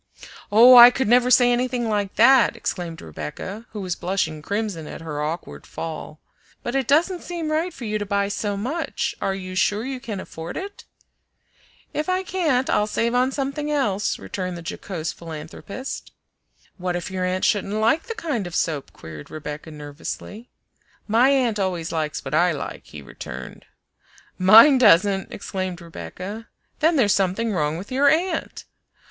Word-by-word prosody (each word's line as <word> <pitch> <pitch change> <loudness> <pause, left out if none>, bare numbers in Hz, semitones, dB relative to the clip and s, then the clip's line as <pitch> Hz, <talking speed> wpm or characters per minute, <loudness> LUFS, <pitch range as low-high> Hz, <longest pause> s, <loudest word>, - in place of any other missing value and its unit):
"Oh, 240 +4 +9
I 240 0 +12
could 255 0 -1
never 245 +2 +4
say 245 -1 +6
anything 245 -1 0
like 205 -2 -1
that!" 245 +2 +5
exclaimed 170 -3 -5
Rebecca, 80 - -7
who 210 - -7
was 180 -2 -2
blushing 175 -4 -2
crimson 200 -3 -3
at - - -8
her 150 -2 -5
awkward 155 +3 -5
fall. 160 -1 -7 0.4
"But 240 - -3
it 270 -3 0
doesn't 340 +5 +2
seem 335 -3 -4
right 325 +4 0
for 250 - -9
you 215 0 -2
to 205 - -3
buy 200 0 +1
so 205 0 -2
much. 315 +7 -2
Are 195 - 0
you 185 -1 -7
sure 205 +4 +1
you 265 -1 -4
can 225 -6 -5
afford 165 -2 -7
it?" 400 +2 -7 1.1
"If 305 +3 -2
I 370 +1 +1
can't, 310 -9 0
I'll 210 - +2
save 230 +2 0
on 250 +2 +2
something 275 +2 -3
else," 210 -9 0
returned 185 -2 -5
the 170 - -10
jocose 165 -5 -4
philanthropist. 165 - -8 0.7
"What 180 -1 -2
if 175 +1 -4
your 185 -1 -2
aunt 185 +1 0
shouldn't 205 -1 0
like 225 - +1
the 460 - -4
kind 290 - -3
of 175 - -7
soap?" 150 -4 -1
queried 75 -2 -10
Rebecca 150 +1 -7
nervously. 155 +9 -8 0.6
"My 230 +5 +4
aunt 250 -6 +2
always 180 -4 -2
likes 155 -2 -3
what - - -5
I 175 +2 +3
like," 145 - -7
he 75 -2 -10
returned 65 0 -9 0.7
"Mine 225 +9 +8
doesn't!" 195 -3 +4
exclaimed 185 -2 -4
Rebecca 185 +5 -8 0.3
"Then 320 +2 +3
there's 215 -8 +4
something 200 +4 0
wrong 150 -3 0
with 195 +8 -9
your 280 +2 +4
aunt!" 330 +2 -1
205 Hz, 165 wpm, -23 LUFS, 175-255 Hz, 1.1 s, I